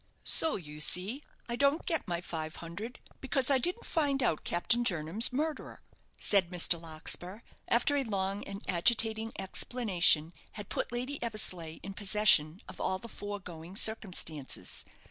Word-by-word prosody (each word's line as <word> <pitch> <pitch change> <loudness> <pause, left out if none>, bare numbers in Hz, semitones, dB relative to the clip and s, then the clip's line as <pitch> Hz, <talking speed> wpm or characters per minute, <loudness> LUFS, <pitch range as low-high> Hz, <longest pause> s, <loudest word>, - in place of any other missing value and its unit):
"So, 320 - +4
you 150 -4 -8
see, 195 - -1 0.3
I 235 - -3
don't 280 +5 +1
get 325 -2 -1
my 175 -1 -2
five 160 -3 -6
hundred, 200 +9 -8 0.2
because 270 0 +2
I 270 - +4
didn't 355 - -2
find 280 -4 0
out 160 -10 0
Captain 235 +8 +2
Jernam's 180 +2 +4
murderer," 305 +4 -4 0.4
said 195 -4 +3
Mr. 175 -1 +1
Larkspur, 170 +5 -4 0.3
after 245 +5 +2
a 280 - +1
long 200 -3 -2
and 200 +1 -8
agitating 220 +4 +2
explanation 185 -6 +2 0.2
had 205 -2 -8
put - - -3
Lady 255 +4 -4
Eversleigh 185 -8 0
in 195 - -7
possession 195 -5 +3
of - - -10
all 185 - -1
the 210 - -10
foregoing 190 -5 -8
circumstances. 185 -10 -1
200 Hz, 145 wpm, -31 LUFS, 175-240 Hz, 0.4 s, So